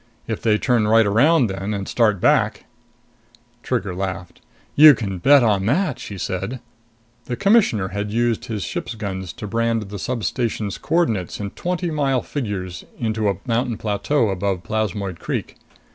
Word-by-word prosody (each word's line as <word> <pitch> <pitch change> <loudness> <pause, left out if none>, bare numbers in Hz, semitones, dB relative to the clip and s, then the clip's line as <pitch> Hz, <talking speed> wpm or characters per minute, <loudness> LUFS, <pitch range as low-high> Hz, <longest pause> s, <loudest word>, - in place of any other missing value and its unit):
If 110 - -3
they 110 -2 +3
turn 115 -3 +1
right 110 +1 +5
around 130 +9 +4
then, 100 +1 -3
and 100 -1 -4
start 110 -5 +2
back - - +2 0.5
" 120 +1 -33
Trigger 105 -8 -2
laughed. 95 -1 -5 0.3
"You 150 -1 +9
can 95 -5 -4
bet 140 +5 +6
on 100 -3 +2
that!" 145 - +1
she 100 - -7
said. 95 +7 -3 0.7
The 125 - -3
Commissioner 195 - +3
had 100 +1 -3
used 120 +1 0
his 110 -6 -4
ship's 115 0 -4
guns 95 -5 -5
to - - -8
brand 115 -1 -1
the 100 0 -6
substation's 110 +1 -2
coordinates 115 - 0
in 100 -1 -4
twenty 175 -1 -3
mile 135 -4 0
figures 95 -9 -4
into 110 -2 0
a 100 - -1
mountain 120 -1 0
plateau 110 +4 0
above 95 -1 -2
Plasmoid 100 -3 -2
Creek. - - -4
110 Hz, 160 wpm, -21 LUFS, 100-120 Hz, 0.7 s, You